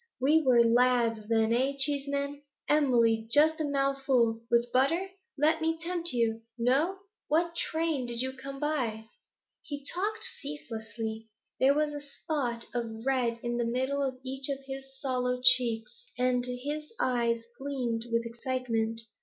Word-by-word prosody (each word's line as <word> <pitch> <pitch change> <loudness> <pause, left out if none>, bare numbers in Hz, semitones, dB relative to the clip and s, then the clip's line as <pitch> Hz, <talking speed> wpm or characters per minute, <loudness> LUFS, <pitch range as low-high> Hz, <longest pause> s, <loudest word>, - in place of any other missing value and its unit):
We 300 +5 +4
were 250 -5 +5
lads 235 -2 +2
then, 225 0 +3
eh, 260 +3 +2
Cheeseman? 280 0 0 0.3
Emily, 235 -7 +3
just 310 +5 +5
a - - 0
mouthful, 275 -5 +1
with 235 0 +2
butter? 330 +9 +2 0.3
Let 315 +3 +2
me 325 0 0
tempt 345 0 +4
you. 230 -2 0 0.2
No? 275 +11 +2 0.3
What 335 +2 +1
train 320 -6 -1
did 235 -1 -3
you 260 +1 -1
come 275 +1 -8
by?' 250 -8 -1 0.6
He 285 -1 -7
talked 415 +5 -2 0.2
ceaselessly. 225 -6 -6 0.3
There 275 +2 +4
was 300 0 0
a 290 - -5
spot 275 -5 -3
of 230 -1 -4
red 245 -3 0
in 240 0 -2
the 240 - 0
midst 255 +4 -1
of 275 -2 -1
each 265 +1 -3
of 275 -1 -4
his 270 0 -8
sallow 250 -2 -1
cheeks, 255 - +2
and 250 0 +1
his 290 +5 -5
eyes 235 -2 0
gleamed 245 -4 -3
with 230 0 +1
excitement. 230 -2 -1
260 Hz, 145 wpm, -29 LUFS, 235-285 Hz, 0.6 s, were